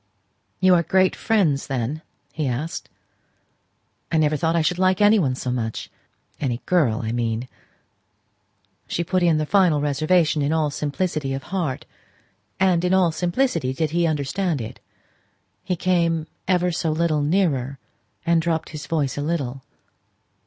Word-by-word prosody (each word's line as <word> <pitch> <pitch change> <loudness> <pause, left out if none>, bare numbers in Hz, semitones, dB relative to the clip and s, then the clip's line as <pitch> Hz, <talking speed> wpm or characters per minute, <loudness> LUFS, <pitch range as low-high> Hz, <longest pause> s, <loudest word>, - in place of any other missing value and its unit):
"You 185 0 +5
are 175 - +5
great 185 +2 +2
friends, 175 -11 +1
then?" 135 +3 -2 0.3
he 155 -3 -2
asked. 135 +7 -4 1.2
"I 160 - +2
never 155 -1 +3
thought 160 +3 0
I 165 - +2
should 180 +3 0
like 185 0 +3
any 210 +1 +5
one 135 -8 +1
so 125 -1 -3
much, 115 -3 -3 0.5
any 125 -5 -1
girl 140 -11 +2
I 110 - -2
mean." 115 0 -2 1.4
She 170 - -1
put 185 +2 0
in 170 -3 +3
the 155 - 0
final 180 -4 +3
reservation 155 +2 +2
in 140 +1 +1
all 155 -2 +1
simplicity 145 -1 -2
of 135 - -6
heart; 165 -9 -2 0.7
and 185 -3 +3
in 180 +1 +3
all 180 -3 +3
simplicity 175 - 0
did 155 +2 -1
he 170 0 +2
understand 155 +2 -1
it. 110 - -7 0.8
He 180 - -1
came 170 -3 +1 0.2
ever 180 -1 +2
so 165 -1 -1
little 155 -1 +1
nearer, 145 -5 +1 0.5
and 170 -1 +3
dropped 160 -1 -1
his 150 -2 -8
voice 145 -4 -1
a - - -1
little. 140 -4 -2
160 Hz, 150 wpm, -23 LUFS, 140-180 Hz, 1.4 s, You